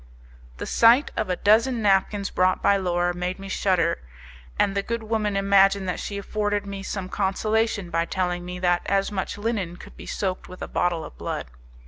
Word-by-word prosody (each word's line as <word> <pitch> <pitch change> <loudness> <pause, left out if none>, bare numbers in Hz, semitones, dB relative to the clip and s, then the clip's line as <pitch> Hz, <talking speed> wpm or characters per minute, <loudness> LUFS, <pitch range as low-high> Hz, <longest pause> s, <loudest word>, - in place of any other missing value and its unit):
The - - -5
sight 235 +5 +5
of 215 - -2
a 180 - +1
dozen 230 +6 +3
napkins 200 0 +2
brought 185 0 +2
by 200 - +5
Laura 175 -2 0
made 180 +1 -3
me 195 0 -8
shudder, 185 -3 +1 0.6
and 195 - +2
the 200 - +1
good 230 +2 -4
woman 215 -2 -1
imagined 195 0 +4
that 180 - -2
she 200 - -4
afforded 205 0 -1
me 200 -1 -6
some 195 -1 -4
consolation 205 0 0
by 165 0 +1
telling 180 0 -2
me 180 0 -6
that 175 -1 +2
as 195 +1 +1
much 195 -1 -3
linen 205 -5 -2
could - - -13
be - - -11
soaked 185 -2 -3
with 185 - -8
a - - -4
bottle 175 -2 0
of 60 - -13
blood. - - -4
195 Hz, 190 wpm, -24 LUFS, 180-205 Hz, 0.6 s, sight